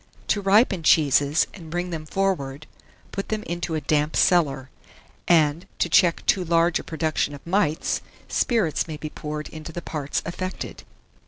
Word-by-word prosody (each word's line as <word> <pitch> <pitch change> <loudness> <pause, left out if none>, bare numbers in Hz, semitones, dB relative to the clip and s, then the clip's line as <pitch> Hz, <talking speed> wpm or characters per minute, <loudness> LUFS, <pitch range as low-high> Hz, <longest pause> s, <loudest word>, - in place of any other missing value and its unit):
To 205 - +2
ripen 195 -1 +4
cheeses, 145 -1 +4
and 165 -5 -11
bring 175 +2 -3
them 155 -2 -5
forward, 155 -7 -1 0.5
put 195 - -5
them 215 -1 -2
into 170 -2 -3
a 155 - -1
damp 150 +1 0
cellar; 140 -7 +2 0.6
and, 165 +1 +3
to - - 0
check 175 -3 +3
too 190 - +3
large 170 0 +2
a - - -7
production 155 -2 -1
of 140 - -14
mites, 170 -4 0 0.3
spirits 215 - +1
may 155 -2 -5
be 155 0 -6
poured 150 0 -5
into 155 +1 -8
the 175 - -5
parts 145 -3 -3
affected. 185 +2 -5
165 Hz, 160 wpm, -24 LUFS, 150-180 Hz, 0.6 s, ripen